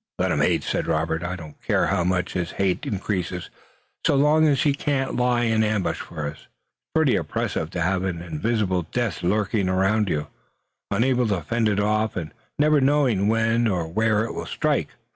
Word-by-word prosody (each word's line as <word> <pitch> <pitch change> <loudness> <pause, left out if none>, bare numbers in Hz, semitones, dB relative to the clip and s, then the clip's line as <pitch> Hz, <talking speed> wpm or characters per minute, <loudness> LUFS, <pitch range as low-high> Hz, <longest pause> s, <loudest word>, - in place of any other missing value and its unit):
"Let - - +1
him - - +1
hate," - - +2
said - - -2
Robert. 80 0 0
"I 85 +1 -3
don't 80 -4 -11
care - - +1
how 95 -3 +1
much 90 0 0
his 90 -2 -2
hate 95 +8 -1
increases, 95 -5 -3 0.5
so - - +3
long 150 +3 +4
as 145 +2 +2
he 145 -3 +3
can't 140 -2 -1
lie 125 -1 +2
in 110 -1 +2
ambush 105 -3 0
for 80 -3 -6
us. 75 0 -5
It's - - -50
pretty - - +4
oppressive 80 - -2
to 90 0 -4
have 95 +2 +1
an 90 -3 -2
invisible 90 +1 -1
death 120 -7 -1
lurking 100 +1 +1
around 95 +3 +2
you, 75 -3 -1 0.6
unable 125 +3 +2
to 100 -5 -1
fend 115 -2 +1
it 105 -1 0
off, 110 +1 +1
and 80 -4 -5 0.2
never 150 0 +4
knowing 130 -8 +2
when 115 +1 +2
or 90 -6 -1
where 110 +4 +1
it - - -5
will - - -5
strike." - - 0
105 Hz, 190 wpm, -24 LUFS, 90-120 Hz, 0.6 s, long